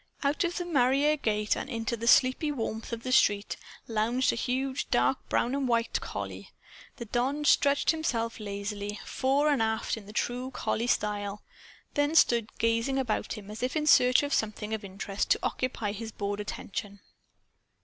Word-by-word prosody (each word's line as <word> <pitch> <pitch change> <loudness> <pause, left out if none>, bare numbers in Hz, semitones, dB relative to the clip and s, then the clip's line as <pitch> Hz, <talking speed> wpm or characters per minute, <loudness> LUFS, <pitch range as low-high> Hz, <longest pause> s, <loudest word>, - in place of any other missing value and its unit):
Out 285 +6 +1
of 345 0 -1
the 355 - -2
mairie 280 -1 +3
gate 210 -6 0
and - - -5
into 230 -2 -2
the 230 +1 -5
sleepy 260 +3 +4
warmth 225 -4 -4
of 230 0 -5
the 255 - -3
street 205 -4 +3 0.3
lounged 230 +3 +1
a - - -2
huge 260 +3 -2
dark - - +1
brown 245 - +1
and 275 -1 0
white 235 -1 +1
collie. - - -6 0.5
The 235 - -7
don 260 +6 -1
stretched 285 -1 +4
himself 235 -9 -2
lazily, 205 0 -4
fore 275 +3 +1
and 285 -5 +2
aft, 220 0 0
in 205 -1 -10
true 245 +4 -2
collie 240 -2 -2
style, 205 -2 -1 0.5
then 290 +2 +1
stood 235 -7 +3
gazing 230 +4 +1
about 250 -5 -1
him 210 -2 -9
as 215 - -7
if 255 +4 -1
in 305 -1 0
search 250 -3 +6
of 285 +1 -2
something 215 -2 -1
of 220 -1 -3
interest 195 +1 -3
to - - +4
occupy 235 -5 -2
his 220 +2 -6
bored 205 0 -3
attention. 205 0 -5
235 Hz, 170 wpm, -29 LUFS, 210-270 Hz, 0.5 s, search